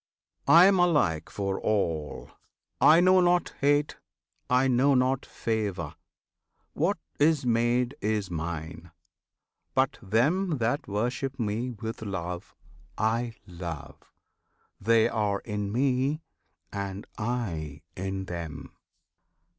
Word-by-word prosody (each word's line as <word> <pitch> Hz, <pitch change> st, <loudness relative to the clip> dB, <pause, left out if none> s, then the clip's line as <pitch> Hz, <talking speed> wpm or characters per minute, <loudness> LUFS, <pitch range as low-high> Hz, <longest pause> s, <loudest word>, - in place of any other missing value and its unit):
I 170 Hz, +2 st, +9 dB
am 195 Hz, -1 st, +5 dB
alike 145 Hz, -, +2 dB
for 100 Hz, -1 st, -2 dB
all! 85 Hz, -8 st, -1 dB, 0.5 s
I 165 Hz, +3 st, +7 dB
know 185 Hz, +1 st, +6 dB
not 175 Hz, 0 st, +2 dB
hate, 145 Hz, +1 st, +2 dB, 0.5 s
I 125 Hz, +1 st, +4 dB
know 130 Hz, +2 st, +4 dB
not 130 Hz, +1 st, +1 dB
favour! 100 Hz, -8 st, -2 dB, 0.8 s
What 170 Hz, +6 st, +1 dB, 0.2 s
is 150 Hz, -2 st, +3 dB
made 120 Hz, +2 st, +1 dB
is 105 Hz, -3 st, -1 dB
Mine! 80 Hz, 0 st, -5 dB, 0.9 s
But 130 Hz, 0 st, +1 dB
them 145 Hz, -, +1 dB
that 120 Hz, +4 st, -1 dB
worship 125 Hz, +6 st, -2 dB
Me 115 Hz, +3 st, -1 dB
with 115 Hz, -1 st, -6 dB
love, 90 Hz, -3 st, -5 dB, 0.4 s
I 115 Hz, +2 st, 0 dB
love; 85 Hz, -4 st, -8 dB, 0.7 s
They 115 Hz, +2 st, +4 dB
are 105 Hz, -3 st, -1 dB
in 105 Hz, -2 st, -3 dB
Me, 135 Hz, +5 st, +1 dB, 0.5 s
and 100 Hz, 0 st, -4 dB
I 85 Hz, -, -3 dB
in 95 Hz, +1 st, -3 dB
them! 80 Hz, -5 st, -7 dB
110 Hz, 105 wpm, -28 LUFS, 95-135 Hz, 0.9 s, I